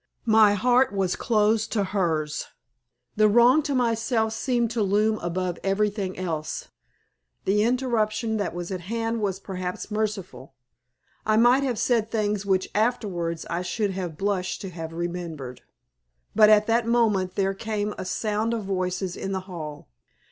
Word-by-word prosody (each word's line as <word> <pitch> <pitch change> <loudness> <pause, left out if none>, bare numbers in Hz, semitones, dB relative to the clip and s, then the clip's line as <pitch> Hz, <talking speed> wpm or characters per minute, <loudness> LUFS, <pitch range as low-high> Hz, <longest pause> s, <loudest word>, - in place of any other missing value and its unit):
My 215 -2 +5
heart 250 +5 +3
was 195 -3 0
closed 220 -1 +1
to 210 -3 +1
hers. 160 -6 -1 0.7
The 215 0 +6
wrong 240 +7 +6
to 290 -2 -2
myself 230 -2 +1
seemed 240 -1 0
to 230 -1 -1
loom 210 +2 +2
above 175 0 -2
everything 195 -1 0
else. 160 -4 -4 0.8
The 205 +2 +3
interruption 230 -2 0
that 205 -4 -2
was 175 +1 -5
at 185 -2 -3
hand 225 +4 -2
was 195 -2 -1
perhaps 185 0 -5
merciful. 200 -10 -4 0.7
I 215 0 +2
might 245 +4 +5
have 255 -4 -1
said 230 -2 +1
things 210 -3 -1
which 190 -1 +2
afterwards 195 -8 -1
I 170 +1 -2
should 200 +3 -1
have 180 -5 -5
blushed 195 -1 -1
to 195 - -6
have 165 -1 -6
remembered. 165 -6 -5 0.7
But 215 -1 +7
at 210 0 +6
that 230 +1 +1
moment 215 -6 +2
there 195 -1 +1
came 210 0 -3
a 190 - -4
sound 215 +4 -1
of 220 - -4
voices 185 -1 -2
in 195 - -4
the 190 - -2
hall. 160 -6 -8
205 Hz, 155 wpm, -25 LUFS, 185-225 Hz, 0.8 s, But